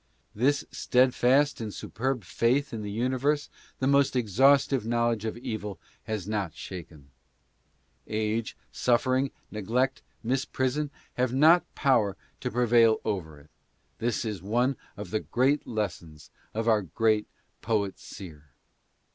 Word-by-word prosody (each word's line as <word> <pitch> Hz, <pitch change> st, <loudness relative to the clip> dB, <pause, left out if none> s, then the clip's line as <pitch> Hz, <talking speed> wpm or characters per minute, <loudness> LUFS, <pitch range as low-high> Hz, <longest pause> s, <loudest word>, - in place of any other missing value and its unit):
This 135 Hz, +6 st, +1 dB
steadfast 130 Hz, +2 st, +3 dB
and 110 Hz, -2 st, -4 dB
superb 125 Hz, +3 st, -3 dB
faith 120 Hz, +10 st, +1 dB
in 110 Hz, -, -4 dB
the 105 Hz, -, -5 dB
universe 130 Hz, +7 st, 0 dB, 0.3 s
the 130 Hz, -, -1 dB
most 140 Hz, 0 st, +3 dB
exhaustive 130 Hz, +3 st, +4 dB
knowledge 115 Hz, -1 st, 0 dB
of 110 Hz, -, -3 dB
evil 105 Hz, -4 st, -5 dB, 0.3 s
has 110 Hz, -4 st, -3 dB
not 100 Hz, -6 st, -2 dB
shaken. 80 Hz, -6 st, -9 dB, 1.0 s
Age, 110 Hz, +1 st, -2 dB
suffering, 130 Hz, +2 st, +2 dB, 0.2 s
neglect, 120 Hz, +6 st, 0 dB, 0.2 s
misprision, 130 Hz, +3 st, 0 dB, 0.3 s
have 125 Hz, 0 st, +1 dB
not 160 Hz, +5 st, +7 dB
had -, -, -42 dB
power 115 Hz, -9 st, +2 dB, 0.2 s
to -, -, -2 dB
prevail 115 Hz, -1 st, +4 dB
over 80 Hz, -9 st, -3 dB
it. 75 Hz, -, -22 dB, 0.5 s
This 120 Hz, 0 st, -1 dB
is 105 Hz, -5 st, -4 dB
one 120 Hz, +7 st, +1 dB, 0.2 s
of 100 Hz, -3 st, -7 dB
the 110 Hz, -, +1 dB
great 135 Hz, +7 st, +1 dB
lessons 85 Hz, -9 st, -5 dB, 0.2 s
of 115 Hz, +1 st, -1 dB
our 110 Hz, -2 st, +4 dB
great 105 Hz, +4 st, +1 dB, 0.3 s
poet 105 Hz, -4 st, -1 dB
seer. 75 Hz, -7 st, -11 dB
115 Hz, 130 wpm, -28 LUFS, 105-130 Hz, 1.0 s, not